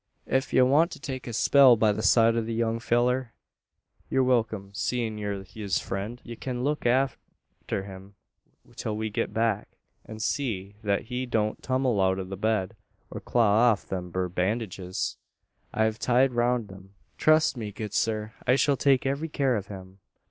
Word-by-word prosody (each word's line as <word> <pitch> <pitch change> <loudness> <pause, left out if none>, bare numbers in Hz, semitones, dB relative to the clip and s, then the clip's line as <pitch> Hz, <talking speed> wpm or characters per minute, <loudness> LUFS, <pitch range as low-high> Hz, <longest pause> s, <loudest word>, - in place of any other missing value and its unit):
Ef 130 +1 0
ye - - +3
want 145 +7 +4
to - - -9
take 130 -2 -6
a - - -4
spell 130 +2 +6
by 110 -1 +3
the 105 +1 -3
side 115 +2 +4
o' 115 - +1
the 115 0 -4
young 115 0 0
fellur, 120 +1 +1 0.8
ye're 130 - +2
wilkim 110 -6 0
seein' 110 0 -2
ye're 100 -2 -3
his 100 +1 -3
friend. 105 +5 -4
Ye 120 - -7
kin 125 0 -4
look 150 -1 0
arter 130 -5 -2
him, 95 0 -11 0.6
till 105 -1 -3
we 110 0 -3
git - - -2
back, 110 -2 -1 0.3
an 110 - -9
see 110 -4 -2
thet 100 -1 0
he 125 +2 -4
don't 110 -3 -1
tummel 130 -5 +1
out 95 0 +2
o' 95 - -3
the 95 +1 -6
bed, 105 -2 -1 0.4
or - - -5
claw 110 -3 +3
off 105 -3 0
them 90 -2 -5
thur 90 +1 -1
bandidges, 95 0 -2 0.5
I've 110 0 0
tied 125 +2 +3
roun 120 -1 +1
him." 95 +1 -14 0.2
"Trust 155 -1 +4
me, 110 -4 -5
good 105 +1 -6
sir, 110 -1 -1
I 125 - +5
shall 140 0 +2
take 135 -1 +3
every 140 +4 -1
care 135 -4 +1
of 100 -2 -4
him. 95 -1 -10
110 Hz, 175 wpm, -27 LUFS, 100-125 Hz, 0.8 s, spell